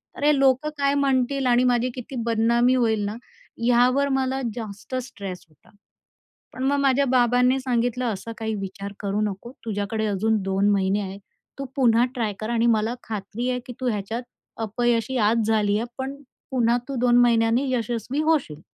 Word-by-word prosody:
अरे! 295 +1 +3
लोकं 270 +2 +3
काय 280 0 +2
म्हणतील 275 -1 +1
आणि 245 0 +4
माझी 245 0 +2
किती 255 +1 -7
बदनामी 235 +2 +3
होईल 220 -4 +1
ना, 205 - -3 0.5
यावर 250 +3 +3
मला 265 0 -1
जास्त 225 +2 -7
स्ट्रेस 200 -8 -6
होता. 155 - -26 0.8
पण 255 - -5
मग 285 +1 +2
माझ्या 275 0 +3
बाबांनी 250 +1 +3
सांगितलं, 245 -1 -1
"असा 230 0 -3
काही 220 -1 -2
विचार 200 0 -6
करू 200 +1 -1
नको. 210 +3 -3
तुझ्याकडे 215 0 -2
अजून 210 +2 +1
2 195 +1 +1
महिने 195 0 +1
आहेत. 195 0 -6 0.4
तू 275 - -3
पुन्हा 240 -2 +4
ट्राय 225 -4 -1
कर 215 +1 -4
आणि 235 0 +2
मला 220 +3 -1
खात्री 220 +3 -4
आहे 250 - -1
की 250 - -7
तू 255 - +1
ह्याच्यात, 220 +3 -3 0.3
अपयशी 235 +2 0
आज 225 -1 +1
झाली 210 -2 +2
आहे, 230 - -2
पण 270 +1 -3 0.4
पुन्हा 240 -2 +2
तू 275 - -3
2 245 -1 +4
महिन्यांनी 235 +3 +2
यशस्वी 240 +3 -2
होशील." 290 - 0
235 Hz, 165 wpm, -24 LUFS, 215-255 Hz, 0.8 s, आणि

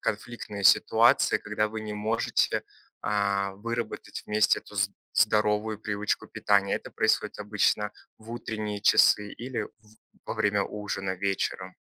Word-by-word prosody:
конфликтные 105 -2 -4
ситуации, - - +5
когда 105 0 -1
вы 110 0 -5
не 105 -1 -5
можете, 110 +2 0 0.4
а, 100 -1 0
выработать 115 +4 -5
вместе 105 0 +3
эту 105 - -15
з 100 0 +2 0.2
здоровую 105 +1 +2
привычку 105 -1 -2
питания. 100 -1 +2
Это - - -9
происходит - - +1
обычно 105 0 +1 0.3
в 110 +1 -13
утренние 110 -3 -4
часы 105 0 +5
или 125 +1 -4
в - - -7 0.6
во - - -3
время 105 -1 +1
ужина 95 -2 -4
вечером? 95 +1 -2
105 Hz, 130 wpm, -27 LUFS, 100-110 Hz, 0.6 s, ситуации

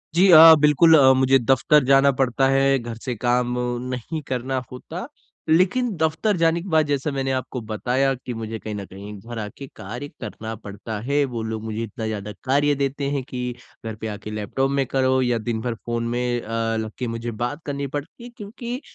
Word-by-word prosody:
जी 185 +3 +5
अ, 160 0 +11
बिल्कुल 150 +2 +6
अ, 135 -2 +7
मुझे 130 +1 +4
दफ़्तर 135 +4 +3
जाना 135 +1 +5
पड़ता 135 0 +2
है, 135 0 +3
घर 120 -1 -6
से 125 +2 -4
काम 120 +2 0 0.4
नहीं 130 +6 -4
करना 130 +1 -2
होता। 165 - -7 0.4
लेकिन 185 +10 +3
दफ़्तर 160 +6 +1
जाने 165 0 +2
के 190 - -9
बाद 160 -2 +3
जैसा 145 +1 -1
मैंने 135 -1 -2
आपको 130 0 -3
बताया 130 +5 +1
कि 125 - -4
मुझे 110 -1 -5
कहीं 110 - -6
ना 100 -1 -5
कहीं 100 +2 -10
घर 115 +3 -7
आके 110 +6 -7
कार्य 120 +9 -7
करना 110 0 -6
पड़ता 105 0 -7
है। 140 +5 +1
वो 120 -4 -5
लोग 110 -1 -4
मुझे 110 0 -4
इतना 110 0 -6
ज़्यादा 105 -1 -4
कार्य 145 +2 +2
देते 140 0 -2
हैं 140 -2 -1
कि 125 -1 -4 0.3
घर 110 -1 -4
पे 110 - -3
आके 105 0 -6
लैपटॉप 110 +6 -1
में 140 -1 +1
करो 130 0 +2
या 125 -2 +1
दिन 115 0 -3
भर 120 0 -2
फ़ोन 115 0 -2
में 120 0 -1
अ, 115 0 -2
लग 110 -1 -4
के 125 - -2
मुझे 115 +1 -4
बात 145 +6 -3
करनी 140 -1 -3
पड़ती 145 - -7
है 240 - -8
क्योंकि 235 +5 -6
130 Hz, 205 wpm, -23 LUFS, 115-145 Hz, 0.4 s, अ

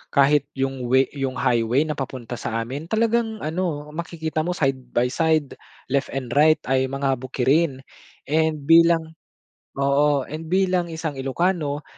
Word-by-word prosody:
Kahit 140 0 +4
yung 135 -2 -2
way 130 +2 +4
'yong 135 -2 -3
highway 120 +4 +2
na 155 - -3
papunta 125 -3 -5
sa 115 +1 -2
amin 140 +7 -6
talagang 225 +1 0
ano 155 -2 -3
makikita 160 -1 -3
mo 180 - -1
side 135 -5 0 0.2
by 120 +1 +3
side 155 0 +1 0.4
left 140 +1 +1
and 130 -3 -4
right 155 +2 +5
ay 130 0 +2
mga 135 -1 -1
bukirin. 135 +3 0 0.4
And 155 0 +1
bilang 165 0 +4 0.6
oo, 140 +1 +2
and 155 +2 -7
bilang 185 0 +1
isang 160 -4 -4
ilocano 150 +1 -1
145 Hz, 145 wpm, -23 LUFS, 135-160 Hz, 0.6 s, right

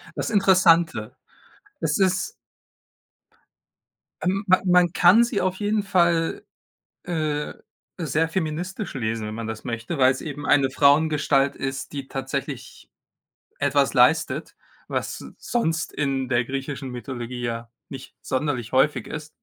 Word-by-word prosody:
Das - - -2
Interessante. 175 - +3 0.6
Es 150 -2 0
ist 185 -2 +1 1.9
Ähm, 190 +2 0
ma 185 0 +5
man 180 -1 +4
kann 190 +7 +6
sie 235 -3 -1
auf 185 0 -1
jeden 210 +1 0
Fall, 170 -4 +1 0.6
äh, 155 -4 -2 0.5
sehr 160 0 0
feministisch 180 +4 -3
lesen, 110 -3 -2
wenn 105 - -5
man 115 0 -5
das 110 -1 -6
möchte, 115 +6 -4
weil's 130 -1 +3
eben 145 -1 -6
eine 140 -2 +4
Frauengestalt 145 0 +3
ist, 135 +2 -5
die 140 -2 -5
tatsächlich 135 0 -5 0.7
etwas - - +2
leistet, - - +2 0.3
was - - -3
sonst 165 -9 -1
in 135 -3 -1
der 120 -1 +2
griechischen 135 +1 -5
Mythologie 125 -1 -6
ja 115 -1 -4 0.2
nicht 135 -1 -10
sonderlich 130 -4 -2
häufig 130 -2 +2
ist. 150 0 -6
150 Hz, 125 wpm, -24 LUFS, 130-175 Hz, 1.9 s, kann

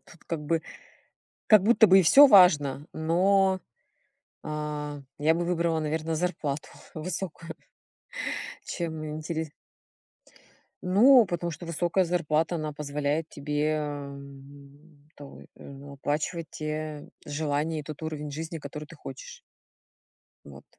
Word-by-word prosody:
тут 170 - -19
как 165 -3 -3
бы 165 +1 0 0.8
как 215 -3 +7
будто 225 +1 +6
бы 190 -1 +7
и - - +3
всё 275 - +8
важно, 155 - +5
но, 190 +4 +2 0.8
а, 150 -1 -5 0.2
я 155 +2 +3
бы 175 +1 -1
выбрала, 170 -2 0
наверно, 160 +1 -2
зарплату 155 -4 -2 0.3
высокую, 165 0 -5 1.1
чем 160 -2 -4
интере 155 0 -4 1.3
Ну, 230 +7 +6
потому 175 -1 -3
что 170 - -8
высокая 170 +3 +1
зарплата, 165 -1 0
она 155 -2 -3
позволяет 150 +1 -2
тебе, 150 +2 -1
ам, 140 +1 -10
то 145 - -11
в - - -13
ну, 140 +1 -11
оплачивать 155 +4 -3
те 155 -1 -5 0.2
желания 150 +1 -2
и - - -6
тот 155 +1 -8
уровень 150 -2 -5
жизни, 160 +2 -5
который 150 +1 -8
ты - - -14
хочешь. 485 -1 -10 1.1
Вот. - - -13
155 Hz, 120 wpm, -27 LUFS, 150-170 Hz, 1.3 s, всё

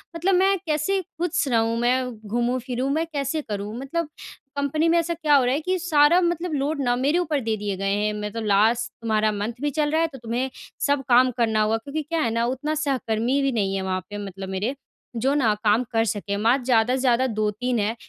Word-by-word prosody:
मतलब 360 +4 +1
मैं 385 +1 +3
कैसे 315 +5 0
खुश 340 -2 -2
रहूँ 230 -2 +1
मैं 250 +1 +1 0.2
घूमूँ 240 +3 0
फिरूँ 255 +2 -3
मैं 320 +3 0
कैसे 285 +2 -1
करूँ। 210 -4 -5
मतलब 300 +4 -3 0.5
कंपनी 285 +3 0
में 340 - +4
ऐसा 335 +1 -1
क्या 310 -3 +2
हो 270 - +5
रहा 250 - +2
है 285 - +1
कि 370 +3 0
सारा 325 -1 +4
मतलब 345 -1 -1
लोड 285 +1 -1
ना 245 -1 +2
मेरे 280 +7 +1
ऊपर 310 -5 0
दे 225 -3 -1
दिए 205 -1 -3
गए 195 +1 0
हैं 210 +1 0
मैं 210 0 -4
तो 230 - -4
लास्ट 220 +3 +2
तुम्हारा 215 -1 +1
मंथ 210 +3 -3
भी 295 - +1
चल 295 -1 +2
रहा 320 +1 +2
है 330 - +2
तो - - -7
तुम्हें 240 +3 -2 0.4
सब 285 -1 +1
काम 255 +1 +5
करना 220 -2 +2
होगा 215 +1 +2
क्योंकि 280 +7 -4
क्या 330 +3 -2
है 230 - +1
ना 230 +1 +1
उतना 300 +4 -2
सहकर्मी 250 0 0
भी 275 0 +1
नहीं 200 -5 0
है 195 - -1
वहाँ 185 0 -2
पे 205 - -6
मतलब 195 0 -7
मेरे 205 +8 -2 0.4
जो 260 +4 +1
ना 250 -7 +3
काम 215 +3 +3
कर 225 -1 +2
सके। 200 -1 -2
मात्र 240 +5 +2
ज़्यादा 245 0 +3
से - - -2
ज़्यादा 255 0 +3
2-3 220 +2 -1
हैं। 215 +3 0
250 Hz, 230 wpm, -24 LUFS, 220-295 Hz, 0.5 s, हो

